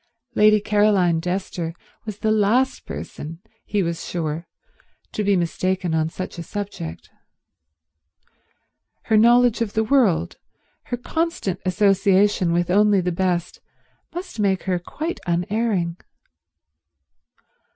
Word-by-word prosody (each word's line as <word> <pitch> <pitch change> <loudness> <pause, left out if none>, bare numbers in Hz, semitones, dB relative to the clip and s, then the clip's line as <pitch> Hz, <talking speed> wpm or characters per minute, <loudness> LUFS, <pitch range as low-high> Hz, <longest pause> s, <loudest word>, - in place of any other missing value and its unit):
Lady 215 -1 +5
Caroline 200 -5 +2
Dester 180 -2 -3 0.3
was 215 -2 -6
the 215 +1 0
last 220 +5 +2
person, 165 +2 -7 0.3
he 205 -2 0
was 170 -1 -3
sure, 165 -1 -3 0.6
to 210 - -2
be 200 -1 +3
mistaken 180 0 -1
on 160 0 +1
such 185 0 -6
a - - -4
subject. 85 - -6 1.9
Her 220 - +1
knowledge 235 +1 +5
of 215 -3 -1
the 220 - +2
world, 205 - +2 0.5
her 245 - -3
constant 320 - -2
association 195 -1 +3
with 175 +1 +1
only 205 +1 +4
the 180 0 -1
best, 175 0 -1 0.5
must 355 -6 -7
make 195 -2 +1
her 180 -2 0
quite 315 - -5
unerring. 180 0 0
195 Hz, 115 wpm, -22 LUFS, 175-215 Hz, 1.9 s, Lady